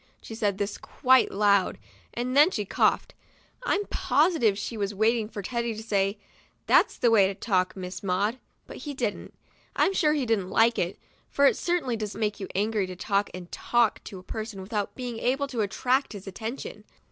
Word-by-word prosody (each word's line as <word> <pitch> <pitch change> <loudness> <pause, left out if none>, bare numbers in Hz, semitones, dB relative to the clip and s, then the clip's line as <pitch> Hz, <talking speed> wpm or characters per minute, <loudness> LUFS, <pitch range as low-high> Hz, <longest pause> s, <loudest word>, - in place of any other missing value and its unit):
She - - -10
said 205 -3 -1
this 200 +1 -3
quite 260 -1 +3
loud, 200 -1 +2 0.4
and 250 +2 -2
then 295 +4 +7
she 210 - -3
coughed. - - +1 0.5
I'm 415 -4 0
positive 295 - +2
she 210 +3 -4
was 205 -1 -2
waiting 220 +1 +1
for 205 -3 -6
Teddy 235 +2 -2
to 220 - -7
say, 200 -1 0 0.2
' - - -30
' - - -42
That's - - +4
the 235 - +3
way 200 -4 +6
to 195 - -4
talk, 185 -3 0
Miss 185 -1 -6
Maud," 200 +6 0 0.3
but - - -10
he 290 -2 -6
didn't. 230 -6 -3 0.4
I'm 390 - +3
sure 305 -5 +2
she 280 -4 0
didn't 210 -5 0
like 230 +3 +3
it, 175 +2 -1 0.3
for 280 - +3
it - - +5
certainly 345 -9 -1
does 215 -2 -5
make 210 -2 -2
you 195 - -5
angry 210 0 0
to 185 - -7
talk 200 +2 0
and 180 -1 -9
talk 240 -2 +1
to 195 - -8
a 185 - -11
person, 220 0 -6
without 205 0 -3
being 245 -3 -5
able 270 +4 +1
to 240 -4 -2
attract 250 +7 0
his 200 -2 -9
attention. 220 +6 -6
220 Hz, 200 wpm, -27 LUFS, 200-245 Hz, 0.5 s, then